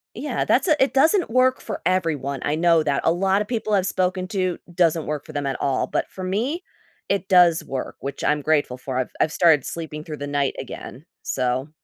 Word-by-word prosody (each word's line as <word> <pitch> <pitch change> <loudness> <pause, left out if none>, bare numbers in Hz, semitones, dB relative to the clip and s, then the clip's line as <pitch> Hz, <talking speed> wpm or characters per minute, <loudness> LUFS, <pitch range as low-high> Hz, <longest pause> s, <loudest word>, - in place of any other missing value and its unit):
Yeah, - - -2
that's - - +2
a 310 - +5
it 270 - -1
doesn't 320 - +3
work 255 +2 +3
for 215 - -6
everyone, 150 -7 0
I 150 - 0
know 165 -1 +3
that. 140 -2 0
A 165 - +5
lot 195 +3 +1
of 210 - -3
people 220 -3 -2
I've 190 -2 +3
spoken 185 0 -1
to, 185 -4 -1 0.2
doesn't 165 -3 +2
work 150 -1 -4
for 155 - -10
them 145 -2 -3
at 135 -2 -2
all, 135 -2 0
but - - -2
for 185 - -8
me, 240 - -2 0.4
it 195 -1 -1
does 175 -3 +5
work, 130 -1 -5
which 140 0 -5
I'm 150 0 +1
grateful 145 -4 +1
for. 130 0 -5
I've 130 - -2
I've 155 - +2
started 160 -6 +4
sleeping 155 -2 -6
through 155 -2 -7
the 145 - -5
night 140 -1 0
again. 135 +2 -8 0.2
So 130 +3 -1
165 Hz, 220 wpm, -23 LUFS, 145-190 Hz, 0.4 s, a